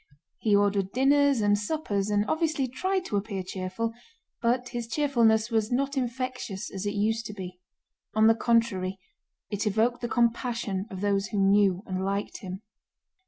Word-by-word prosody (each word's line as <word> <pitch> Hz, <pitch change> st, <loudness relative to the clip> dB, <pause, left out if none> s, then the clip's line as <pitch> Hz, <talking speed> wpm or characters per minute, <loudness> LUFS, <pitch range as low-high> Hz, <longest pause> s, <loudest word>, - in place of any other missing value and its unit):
He 210 Hz, -2 st, +3 dB
ordered 200 Hz, -1 st, +1 dB
dinners 280 Hz, 0 st, +4 dB
and 205 Hz, 0 st, +4 dB
suppers 205 Hz, -5 st, -1 dB
and 205 Hz, 0 st, +2 dB
obviously 315 Hz, -3 st, 0 dB
tried 375 Hz, +9 st, -1 dB
to 205 Hz, -, -1 dB
appear 200 Hz, -2 st, -3 dB
cheerful, 185 Hz, +5 st, -3 dB, 0.5 s
but 245 Hz, +1 st, +1 dB
his 240 Hz, -2 st, -4 dB
cheerfulness 230 Hz, -5 st, +2 dB
was 220 Hz, 0 st, +1 dB
not 275 Hz, +3 st, 0 dB
infectious 250 Hz, -5 st, -3 dB
as 195 Hz, +1 st, -3 dB
it 205 Hz, -, -2 dB
used 220 Hz, +2 st, 0 dB
to 210 Hz, -, -7 dB
be: 180 Hz, -2 st, -8 dB, 0.6 s
on 220 Hz, 0 st, +5 dB
the 225 Hz, -, +7 dB
contrary 225 Hz, -5 st, +1 dB, 0.5 s
it 205 Hz, +1 st, -1 dB
evoked 225 Hz, +4 st, +1 dB
the 240 Hz, -, -2 dB
compassion 235 Hz, -5 st, 0 dB
of 190 Hz, -3 st, -7 dB
those 200 Hz, -1 st, +1 dB
who 210 Hz, -, -4 dB
knew 195 Hz, -1 st, +3 dB
and 185 Hz, -2 st, -3 dB
liked 200 Hz, +1 st, -2 dB
him. 190 Hz, +2 st, -7 dB
220 Hz, 165 wpm, -27 LUFS, 200-245 Hz, 0.6 s, the